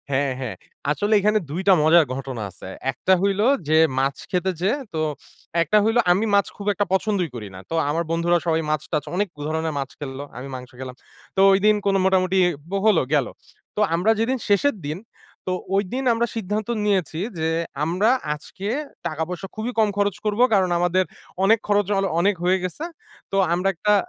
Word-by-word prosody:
হ্যাঁ, 140 0 +1
হ্যাঁ, 130 -4 -4 0.4
আসলে 205 +9 0
এখানে 210 +2 +3
২ 165 +6 -3
টা 195 - +8
মজার 160 +1 +6
ঘটনা 135 -3 -5
আছে। 95 - -11 0.2
১ 125 - -22
টা 190 - +7
হইলো 200 +2 +2 0.2
যে 155 - +5 0.2
মাছ 135 +1 0
খেতে 185 +1 +1
যেয়ে 200 +9 +2 0.2
তো 160 - -2 0.6
একটা 170 +6 +3
হইলো 225 +3 +3
আমি 195 +5 +2
মাছ 200 - +3
খুব 205 - -7
একটা 205 +2 0
পছন্দই 190 -3 +1
করি 110 -3 -6
না। - - -8
তো - - -2
আমার 165 +3 0
বন্ধুরা 170 +1 +2
সবাই 165 -1 +1
মাছ 155 -1 0
টাছ 150 -3 0
অনেক 205 +2 +1 0.2
ধরনের 160 0 -1
মাছ 135 -1 -3
খেলল। 135 -2 -6 0.2
আমি 130 +2 -6
মাংস 125 -1 -8
খেলাম। 130 -1 -7 0.4
তো - - -1
ঐদিন 205 +2 +4
কোন 200 -1 +2
মোটামুটি 190 0 +3 0.5
হলো 210 -6 +5
গেলো 140 -4 +2 0.4
তো 210 - 0
আমরা 185 +6 +3
যেদিন 250 +4 +1
শেষের 215 +7 +3
দিন 155 +3 -3 0.5
তো 185 - +1 0.2
ঐদিন 205 +7 -1
আমরা 235 +1 0
সিদ্ধান্ত 210 -1 -2 0.2
নিয়েছি 185 -6 0 0.2
যে 160 0 0 0.3
আমরা 180 +8 +2 0.2
আজকে 170 +6 -8 0.4
টাকা 155 +1 -2
পয়সা 180 +2 -5
খুবই 225 +3 -3
কম 215 -1 +4
খরচ 205 -2 +1
করব 210 +1 0
কারণ 190 -3 +3
আমাদের 180 +1 +2 0.4
অনেক 220 +3 +5
খরচ 205 -1 +3
অ - - +3 0.2
অনেক 200 +3 +3
হয়ে 185 +1 +3
গেছে। 185 - -4 0.5
তো - - -2 0.2
আমরা 180 +2 0
একটা, 210 +4 +1
185 Hz, 185 wpm, -23 LUFS, 155-205 Hz, 0.6 s, টা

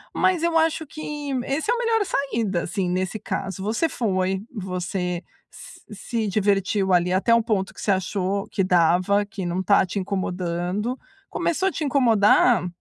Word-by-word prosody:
Mas 370 -3 +2
eu 340 -1 +2
acho 320 -1 +1
que, 295 -1 -6
esse 295 +8 -2
é - - +4
a - - -1
melhor 455 -3 +1
saída, 230 - -1
assim, 185 -1 -2
nesse 185 +4 -2
caso. 195 -1 -4
Você 225 +11 0
foi, 190 -6 -1
você 180 -3 -3 0.7
s-se 220 +2 -3
divertiu 195 -1 +1
ali 180 0 +3
até 195 +5 +3
o 230 - +2
ponto 195 -4 -1
que - - -14
você 205 - +1
achou 195 +1 -1
que 195 - 0
dava, 185 +3 +3
que 200 -3 -6
não 175 +1 -2
está 190 +1 +4
te 190 +2 -3
incomodando. 185 +4 -2 0.3
Começou 375 +3 0
a - - -7
te 320 - -4
incomodar? 230 -6 +4
200 Hz, 165 wpm, -23 LUFS, 185-250 Hz, 0.7 s, é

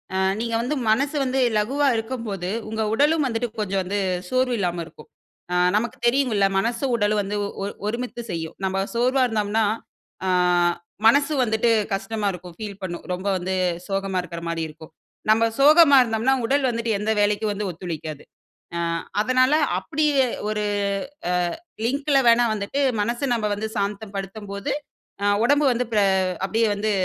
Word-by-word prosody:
அ - - +1 0.2
நீங்க 230 0 -2
வந்து 255 +5 -1
மனசு 275 +7 +2
வந்து 260 +1 0 0.2
லகுவா 275 +7 +1
இருக்கும்போது 225 -6 -4 0.2
உங்க 220 0 -3
உடலும் 295 +4 +3
வந்துட்டு 235 -1 -2
கொஞ்ச 200 -2 -2
வந்து 200 +3 -2 0.3
சோர்வு 255 -1 +1
இல்லாம 175 -2 -1
இருக்கும். - - -16 0.4
ஆ - - +1 0.2
நமக்கு 230 +3 -1
தெரியுமில்ல 235 -6 +2
மனசும், 240 +4 -1
உடலும் 205 -1 +2
வந்து 205 +1 -3 0.3
ஒ - - -2 0.2
ஒருமித்து 240 +2 -3
செய்யும். 165 -1 -4
நம்ம 190 0 0
சோர்வா 255 +2 +3
இருந்தோம்னா 215 -1 0 0.6
ஆ - - +2 0.8
மனசு 285 +5 +4
வந்துட்டு 220 0 +1 0.2
கஷ்டமா 205 +2 -2
இருக்கும் 180 -1 -10
ஃபீல் 205 -2 -7
பண்ணும். 175 -2 -5
ரொம்ப 185 +2 -4
வந்து 185 +1 -3 0.4
சோகமா 195 -1 -1
இருக்குற 170 -1 -7
மாரி 165 -1 -2
இருக்கும். 155 +1 -13 0.4
நம்ம 220 +1 +5 0.2
சோகமா 295 0 +7
இருந்தோம்னா 230 +3 +1
உடல் 275 -1 +2
வந்துட்டு 230 -1 -2
எந்த 215 +1 0
வேலைக்கு 205 +1 +1
வந்து 205 0 -3
ஒத்துழைக்காது. 160 -3 -6 0.5
ஆ - - -1 0.4
அதனால 255 +4 +3 0.2
அப்டியே 280 +6 +1 0.2
ஒரு 210 0 -1 0.7
அ - - +1 0.5
லிங்கில 280 +3 +1
வேணா 235 +1 +6
வந்துட்டு 215 +7 -2 0.2
மனச 235 +5 -2
நாம 215 -3 0
வந்து 215 +2 -3
சாந்தப்படுத்தும்போது 200 0 -4 0.5
ஆ - - +2 0.2
உடம்பு 285 +4 +3
வந்து 245 +1 0
பெ 210 - +4 0.4
அப்டியே 225 +3 +1
வந்து 215 +1 -1
220 Hz, 150 wpm, -23 LUFS, 195-250 Hz, 0.8 s, சோகமா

